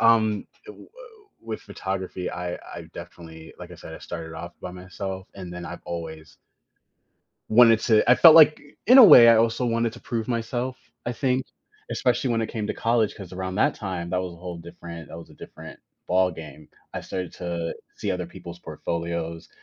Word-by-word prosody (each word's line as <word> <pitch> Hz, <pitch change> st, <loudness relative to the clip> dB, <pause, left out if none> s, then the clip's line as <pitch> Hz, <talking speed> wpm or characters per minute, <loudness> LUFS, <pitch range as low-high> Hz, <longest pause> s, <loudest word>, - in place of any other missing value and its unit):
um, 110 Hz, -2 st, +3 dB, 0.2 s
i -, -, -8 dB
woah -, -, -14 dB, 0.5 s
with 115 Hz, -1 st, -6 dB
photography, 95 Hz, -2 st, -5 dB
I 90 Hz, 0 st, -4 dB
I -, -, -10 dB
definitely 80 Hz, -1 st, -11 dB
like -, -, -10 dB
I -, -, -9 dB
said, -, -, -11 dB
I -, -, -9 dB
started 80 Hz, -2 st, -7 dB
off 85 Hz, +2 st, -8 dB
by 90 Hz, -, -6 dB
myself, 95 Hz, +1 st, -7 dB
and 90 Hz, -3 st, -8 dB
then 90 Hz, 0 st, -7 dB
I've -, -, -8 dB
always 80 Hz, -2 st, -7 dB, 1.1 s
wanted 115 Hz, 0 st, +6 dB
to 110 Hz, -1 st, +3 dB
I -, -, +9 dB
felt 160 Hz, +5 st, +8 dB
like, 155 Hz, -1 st, +7 dB
i 145 Hz, -, -18 dB, 0.2 s
in 255 Hz, +2 st, +9 dB
a 255 Hz, -, +12 dB
way, 125 Hz, -, +10 dB
I 115 Hz, -, +7 dB
also 115 Hz, +2 st, +1 dB
wanted 115 Hz, -1 st, 0 dB
to 120 Hz, -, -12 dB
prove 115 Hz, -2 st, -3 dB
myself, 120 Hz, +2 st, -2 dB, 0.3 s
I 120 Hz, -, -1 dB
think. 130 Hz, +1 st, -1 dB, 0.4 s
Especially 125 Hz, 0 st, 0 dB
when 115 Hz, -1 st, +1 dB
it 110 Hz, -, -3 dB
came 110 Hz, -3 st, -4 dB
to -, -, -3 dB
college, 115 Hz, -2 st, +1 dB
'cause 95 Hz, -3 st, -11 dB
around 95 Hz, 0 st, -4 dB
that -, -, +2 dB
time, 90 Hz, -4 st, -5 dB
that 90 Hz, 0 st, 0 dB
was 90 Hz, -1 st, -5 dB
a -, -, -13 dB
whole 90 Hz, 0 st, -7 dB
different 85 Hz, -2 st, -10 dB
that 80 Hz, -, -9 dB
was 85 Hz, -, -12 dB
a -, -, -15 dB
different -, -, -12 dB, 0.3 s
ballgame. 80 Hz, -4 st, -1 dB, 0.3 s
I -, -, -3 dB
started 90 Hz, -2 st, -5 dB
to 85 Hz, -2 st, -4 dB, 0.2 s
see -, -, -3 dB
other 90 Hz, -1 st, -2 dB
people's 85 Hz, -1 st, -11 dB
portfolios, 85 Hz, -1 st, -5 dB
95 Hz, 195 wpm, -24 LUFS, 85-115 Hz, 1.1 s, a